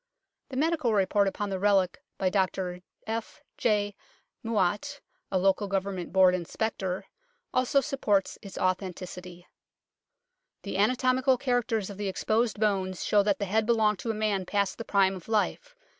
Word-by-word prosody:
The 260 - -5
medical 300 -6 +1
report 200 +1 +3
upon 200 +1 -3
the 190 - -2
relic 195 -2 +2 0.2
by 185 -1 +1
Dr 185 -2 -1 0.2
F. 225 0 -5 0.2
J. 205 -3 +1 0.5
Mouat, 225 +6 0 0.3
a 190 - +2
Local 195 +2 +2
Government 195 -2 -2
Board 185 0 +6
Inspector, 185 +1 -2 0.5
also 255 +2 +3
supports 235 -10 0
its 195 -2 -10
authenticity: 180 -1 -3 0.6
" - - -56
The 200 - -4
anatomical 255 +4 +3
characters 240 -5 0
of 200 - -10
the 205 -1 -3
exposed 215 +3 0
bones 190 -4 0
show 210 - +4
that 200 -1 +1
the 200 - -2
head 215 +3 +1
belonged 215 -4 +3
to 230 - -4
a 220 - 0
man 205 -4 -1
past 200 +1 0
the 230 - -5
prime 195 -1 +3
of 185 -3 -9
life. 355 - -1
205 Hz, 155 wpm, -28 LUFS, 190-230 Hz, 0.6 s, Board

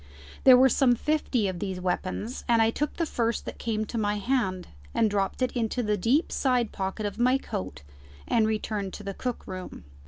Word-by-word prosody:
There 260 -2 +10
were 260 +1 +7
some 255 -1 +4
fifty 265 -6 0
of 185 -2 -4
these 190 -2 -3
weapons, 185 +6 -3
and 230 -1 +5
I 225 0 +4
took 295 +5 -2
the 335 - 0
first 235 -6 -1
that - - -7
came 220 -2 -1
to 230 +2 -4
my 205 -1 +1
hand 200 -5 -1 0.3
and 220 -2 +3
dropped 200 +5 0
it 255 - +1
into 240 +1 -1
the 210 -1 +1
deep 240 - +1
side 250 -4 +1
pocket 195 +2 -3
of 205 +2 -4
my 255 +2 +4
coat 90 - -6 0.4
and 220 -2 +3
returned 210 -3 -2
to 210 - -8
the 200 0 -4
cook 250 +4 -4
room. 185 -1 -7
220 Hz, 200 wpm, -27 LUFS, 195-250 Hz, 0.4 s, There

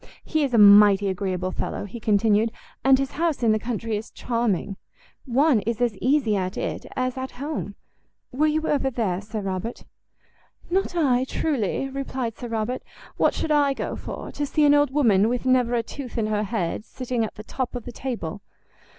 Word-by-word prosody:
"He 315 -2 0
is 275 - 0
a 235 - +2
mighty 205 -1 +7
agreeable 185 -1 -2
fellow," - - -4
he 220 +4 -8
continued, 215 +1 +2 0.3
"and 270 0 +6
his 275 0 -2
house 325 -5 -1
in 225 - +4
the 215 - +2
country 230 -1 -3
is 215 - -7
charming. 220 -5 -1 0.5
One 265 0 +3
is 230 +2 -3
as 240 -3 +1
easy 255 -5 +2
at 185 -1 -2
it - - -4
as 255 0 -1
at 260 0 -4
home. 275 -6 -5 0.6
Were 300 +5 +2
you 310 +1 0
ever 275 -2 +1
there, 210 -7 -1
Sir 215 +1 -5
Robert?" 195 +4 -4 0.9
"Not 380 0 0
I, 260 -6 +2
truly," 270 - -1
replied 265 -4 -4
Sir 245 - -7
Robert; 230 +2 -2 0.4
"what - - +3
should 315 - -2
I 285 -2 +3
go - - -3
for? - - -7
to 295 - -4
see 300 +1 +2
an 290 - +6
old 290 -1 +4
woman 225 -7 +3
with 245 +1 -2
never 250 -2 +3
a 230 - +1
tooth 255 0 -8
in 225 - +1
her 215 0 0
head 200 -3 -2
sitting 245 0 -3
at 220 - -4
the 215 - -9
top 255 +3 -4
of 245 - -5
the 245 - -6
table! 225 -8 -5
240 Hz, 195 wpm, -24 LUFS, 210-270 Hz, 0.9 s, mighty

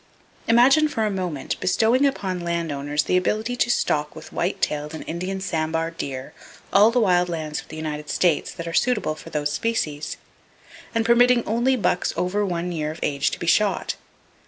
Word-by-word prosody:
Imagine 265 +7 +5
for 225 -7 -1
a 210 - 0
moment 180 -7 -3
bestowing 225 +9 +3
upon 190 -9 -2
land 170 -2 -2
owners 145 +1 -1
the 180 - 0
ability 215 +6 0
to 245 - +1
stock 150 -10 0
with 155 0 -11
white 175 - -1
tailed 150 +1 -2
and - - -7
Indian 185 +3 -3
sambar 165 -2 -1
deer 135 -5 -6 0.4
all 205 +3 +7
the 245 +2 +1
wild 180 -5 +3
lands 155 -3 -3
of - - -19
the 155 - -9
United 150 -1 -5
States 170 -5 +1
that 170 -1 -7
are 165 - -4
suitable 235 -6 +1
for 155 +1 -11
those 150 -2 -1
species, 155 -7 -2 0.8
and 225 0 +1
permitting 240 +1 +5
only 240 +4 +2
bucks 180 -6 0
over 200 +3 0
one 180 -2 -2
year 155 -3 -2
of 160 +1 -7
age 145 0 +1
to - - -5
be - - -4
shot. 205 +4 +2
175 Hz, 185 wpm, -23 LUFS, 155-220 Hz, 0.8 s, all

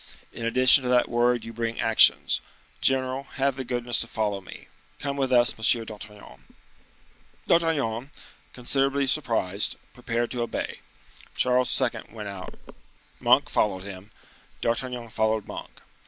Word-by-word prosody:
In 115 - -4
addition 130 +3 +6
to 125 - -3
that 125 -1 +3
word 120 0 +1
you 115 - -8
bring 115 0 -3
actions. 110 -1 +4 0.4
General, 130 0 0
have 135 -1 0
the 135 - -5
goodness 120 -1 -1
to 115 - 0
follow 105 -3 -2
me. 95 - -12 0.3
Come 140 -1 -4
with 135 -2 -1
us, 120 +1 +4
M. 115 +1 +1
d'Artagnan." 105 - -12 1.0
D'Artagnan, 145 -8 +1 0.4
considerably 135 +2 +1
surprised, 115 -8 +1 0.2
prepared 120 -1 -3
to 125 - -3
obey. 120 - -4 0.6
Charles 125 0 +2
II. 120 -4 -1
went 105 -3 -7
out, 95 -2 -8 0.6
Monk - - +4
followed 95 -3 0
him, 100 0 -10 0.5
D'Artagnan 120 0 -2
followed 110 -1 0
Monk. - - -8
120 Hz, 135 wpm, -25 LUFS, 110-130 Hz, 1.0 s, addition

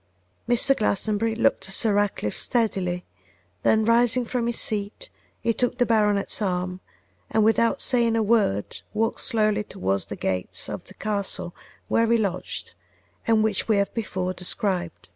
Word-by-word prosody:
Mr. 245 +3 +4
Glastonbury 215 +1 0
looked 225 - +1
at 195 - -1
Sir 220 -3 +2
Ratcliffe 205 - -1
steadily; 185 -7 0 0.6
then 220 0 +3
rising 240 +2 +3
from 235 0 -1
his 235 - 0
seat 210 - -2 0.3
he 230 - 0
took 245 +2 -1
the 245 - +3
baronet's 210 -3 +2
arm, 180 -2 -1 0.5
and 220 0 +2
without 225 +1 +3
saying 235 -3 +3
a 225 - +2
word 205 - +1
walked 225 +2 0
slowly 215 -3 +1
towards 95 - -2
the - - -6
gates 90 -1 -2
of - - -6
the - - -15
castle 200 -4 -3 0.3
where 230 0 +2
he 235 - +5
lodged, 200 -5 -3 0.5
and 220 -1 +4
which 215 -3 0
we 220 - +3
have 200 0 0
before 185 -5 -2
described. 180 -1 -2
215 Hz, 155 wpm, -24 LUFS, 190-230 Hz, 0.6 s, he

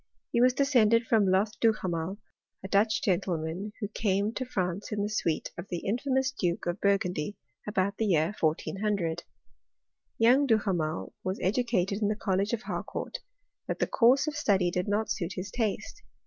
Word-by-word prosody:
He 235 - +2
was 250 0 +5
descended 235 -5 +4
from 220 -4 +3
lodi 190 +3 +2
Duhamely 190 -5 0 0.5
a - - -4
Dutch 205 +2 +2
grentleman, 180 0 -1
who 205 - -2
came 205 0 0
to 255 - -3
Rmce 190 -4 -3
in 205 -1 -1
the 205 - -1
suite 170 -7 -1
of - - -6
the 175 -2 -4
infamous 260 +4 0
Duke 175 -9 -2
of 175 +3 -2
Bur* 200 0 +4
gandyy 180 0 -3 0.3
about 200 -1 0
the 220 - 0
year 165 0 +2
1400. 175 +2 0 1.0
Young 255 +5 +5
Duhamel 185 -9 0
was 185 +1 -2
edacaled 200 -2 +1
in 205 - +2
the 210 - 0
College 200 0 0
of 235 -1 -2
Haicourt; - - -4 0.5
but - - -2
the - - +1
course 250 +4 +4
of 305 -1 -3
study 195 -11 +2
did 180 +2 -1
not 210 +2 0
suit 175 +1 -2
his 185 +2 -5
taste. 220 - -2
205 Hz, 170 wpm, -29 LUFS, 180-225 Hz, 1.0 s, was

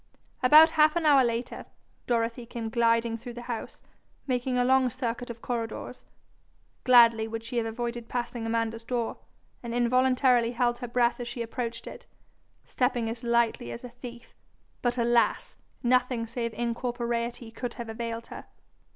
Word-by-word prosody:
About 305 +5 +8
half 310 0 +4
an 340 -2 0
hour 285 -3 +6
after, 235 +1 -4 0.4
Dorothy 235 0 -1
came 230 -2 -5
gliding 230 0 +1
through 240 +1 -9
the 240 - -7
house, 235 -2 -6 0.5
making 250 -1 -1
a 245 - +3
long 260 0 +4
circuit 245 0 -4
of 235 -1 -8
corridors. 230 -2 -5 0.8
Gladly 230 -3 +6
would 225 0 -5
she 235 +1 -5
have 230 -1 0
avoided 235 +1 -4
passing 240 -2 -3
Amanda's 230 0 -1
door, 235 -1 -2 0.4
and 235 -1 -5
involuntarily 250 0 +3
held 240 0 0
her 245 - -5
breath 240 0 +1
as 240 - -5
she 240 0 -4
approached 230 0 -5
it, - - -10 0.6
stepping 245 -3 0
as 230 +1 -8
lightly 235 - +1
as 115 - -8
a 250 - -7
thief. 240 0 -11 0.5
But 245 0 0
alas! 235 0 +1 0.3
nothing 250 -1 +2
save 230 0 -3
incorporeity 235 0 -3
could 240 +1 -5
have 235 -2 -6
availed 230 +1 -5
her. - - -9
240 Hz, 155 wpm, -28 LUFS, 230-250 Hz, 0.8 s, About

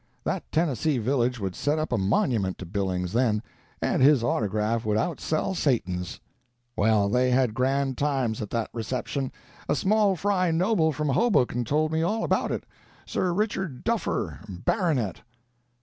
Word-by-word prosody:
That - - -3
Tennessee 155 -3 +1
village 125 +1 0
would 95 -3 -3
set 145 +2 0
up 155 -2 -2
a 125 - +2
monument 100 - +1
to 95 - -7
Billings, 90 -1 -2
then, 115 -3 +2 0.4
and - - +1
his 135 -2 +6
autograph 110 0 0
would 105 -1 +1
outsell 160 - -1
Satan's. 90 - -1 0.6
Well, 105 -1 +3
they 125 +4 +2
had 125 -3 +2
grand 135 +1 0
times 135 -7 0
at 105 - -4
that 115 -2 -2
reception—a 130 +5 -4
small 205 +2 +3
fry 185 0 +1
noble 165 0 +2
from 150 0 -2
Hoboken 130 - +2
told 155 +5 +1
me 160 0 +1
all 210 +7 0
about - - +1
it—Sir 180 - -4
Richard 190 - -2
Duffer, - - -1
Baronet." 120 - -1
130 Hz, 145 wpm, -26 LUFS, 110-160 Hz, 0.6 s, his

